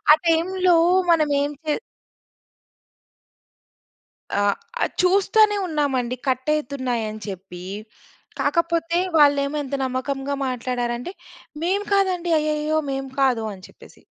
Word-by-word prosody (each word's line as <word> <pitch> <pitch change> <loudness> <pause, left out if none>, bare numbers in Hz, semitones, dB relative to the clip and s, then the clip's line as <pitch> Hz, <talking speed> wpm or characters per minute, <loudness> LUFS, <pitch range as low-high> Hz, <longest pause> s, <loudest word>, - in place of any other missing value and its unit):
ఆ! - - +11
టైమ్‌లో 355 +2 +3 0.4
మనమేం 290 -3 +2
చే 305 - 0 2.6
అ! 205 - 0 0.6
చూస్తానే 400 +3 +4
ఉన్నామండి. 270 -6 -1
కట్ 260 +2 -1
అయితున్నాయని 245 -7 -3
చెప్పీ. 185 -2 -8 0.8
కాకపోతే, 335 0 +1 0.2
వాళ్ళేమో 285 0 +4
ఎంత 280 0 -5
నమ్మకంగా 270 +2 -2
మాట్లాడారంటే, 245 +3 -3 0.5
"మేము 395 +4 0
కాదండి. 365 -3 +1
అయ్యయ్యో! 305 0 0
మేము 270 0 -4
కాదు" 250 -4 +2
అని 185 -2 -12
చెప్పేసి. - - -18
285 Hz, 95 wpm, -22 LUFS, 255-335 Hz, 2.6 s, ఆ